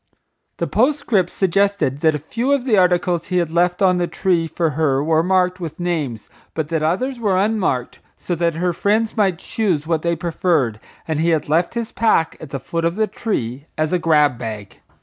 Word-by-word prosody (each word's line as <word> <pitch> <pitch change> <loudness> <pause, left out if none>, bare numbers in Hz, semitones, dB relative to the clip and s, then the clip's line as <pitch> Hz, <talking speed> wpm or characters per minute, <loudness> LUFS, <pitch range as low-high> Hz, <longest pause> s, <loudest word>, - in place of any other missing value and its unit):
The - - -1
postscript 235 - +1
suggested 195 -7 +1
that 155 0 +3
a - - 0
few 235 - -1
of 280 -3 +1
the 235 -5 +3
articles 180 -2 +2
he 180 - -1
had 170 -3 0
left 175 +2 +1
on 180 -1 +4
the 175 - 0
tree 170 -3 0
for 160 0 -1
her 140 -2 +1
were 160 +1 +2
marked 180 +1 +1
with 165 -1 -6
names, 155 -10 -3 0.3
but 155 -2 -2
that 165 -2 -1
others 240 - -1
were 200 -5 +1
unmarked, 190 - 0 0.2
so 180 - -4
that 170 -1 0
her 175 +1 0
friends 215 +5 0
might 195 -5 +2
choose 180 -6 -1
what 160 -1 0
they 170 +1 0
preferred, 160 - 0 0.3
and 155 -2 -1
he 165 +2 +2
had 160 -3 0
left 170 +7 +1
his 235 -1 -3
pack 190 -8 +1
at 155 - -9
the 135 - -4
foot 165 +5 -3
of 170 +1 0
the 220 +1 +2
tree 140 - -4
as 155 +2 0
a 180 - +2
grab 150 -6 +3
bag. 110 -4 -7
170 Hz, 205 wpm, -20 LUFS, 155-190 Hz, 0.3 s, on